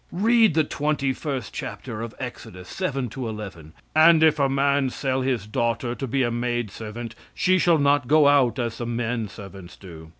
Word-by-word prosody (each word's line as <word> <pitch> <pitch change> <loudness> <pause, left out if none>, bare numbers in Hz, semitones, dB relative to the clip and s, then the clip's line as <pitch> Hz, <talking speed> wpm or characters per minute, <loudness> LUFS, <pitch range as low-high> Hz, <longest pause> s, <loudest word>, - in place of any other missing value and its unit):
Read 220 -1 +3
the 160 - +4
twenty 145 -2 -1
first 135 -5 -5
chapter 110 - -6
of 115 -1 -7
Exodus, 110 -7 -8
7 135 -9 -2
to 125 0 -5
11. 95 -8 -8 0.2
"And 160 0 +6
if 155 -1 +4
a 140 -1 +2
man 140 0 +1
sell 130 0 -2
his 125 -5 -1
daughter 115 +2 -1
to 135 +2 -5
be 135 +2 0
a 120 - 0
maid 120 -2 -2
servant, 115 +2 -7 0.2
she 185 0 +2
shall 170 -2 +4
not 145 -3 +2
go 150 +1 +5
out 135 -5 +3
as 115 -3 -3
the 120 - -4
men 115 -1 -2
servants 95 -3 -11
do. 80 -4 -12
125 Hz, 190 wpm, -24 LUFS, 115-145 Hz, 0.2 s, And